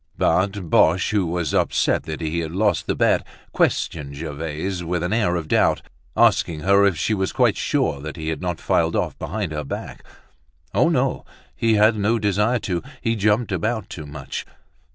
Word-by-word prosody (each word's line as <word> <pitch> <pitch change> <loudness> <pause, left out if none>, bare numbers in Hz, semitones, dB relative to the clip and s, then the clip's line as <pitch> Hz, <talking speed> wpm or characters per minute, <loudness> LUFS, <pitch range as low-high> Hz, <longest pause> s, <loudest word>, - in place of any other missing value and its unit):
But 95 -1 +1
Boche, 80 +3 +3
who 100 -4 +1
was 85 -3 -2
upset - - +1
that 80 +1 -5
he 80 +1 -1
had 80 -1 -4
lost 100 -1 +1
the - - 0
bet, - - +2 0.3
questioned 70 -3 0
Gervaise 80 +4 -4
with 85 0 -2
an 90 +4 -1
air 105 -6 +2
of 80 -3 -3
doubt, - - +2 0.3
asking 80 -3 +3
her 100 +3 +5
if 95 -5 0
she 110 - 0
was 95 -2 -1
quite - - +3
sure 70 -3 0
he 80 -1 -4
had 80 - -3
not 90 -2 -3
filed - - +1
off - - -1
behind 100 -5 -3
her 75 -1 -3
back. 70 - -7 0.7
Oh! - - +4
no, - - 0 0.3
he 115 -1 +2
had 110 +1 +4
no 105 +3 +2
desire 105 +3 +1
to, 90 -3 -2 0.2
he 115 -2 0
jumped 105 +2 +1
about 105 +4 -2
too 80 -3 -7
much. 70 -2 -6
90 Hz, 180 wpm, -22 LUFS, 80-105 Hz, 0.7 s, her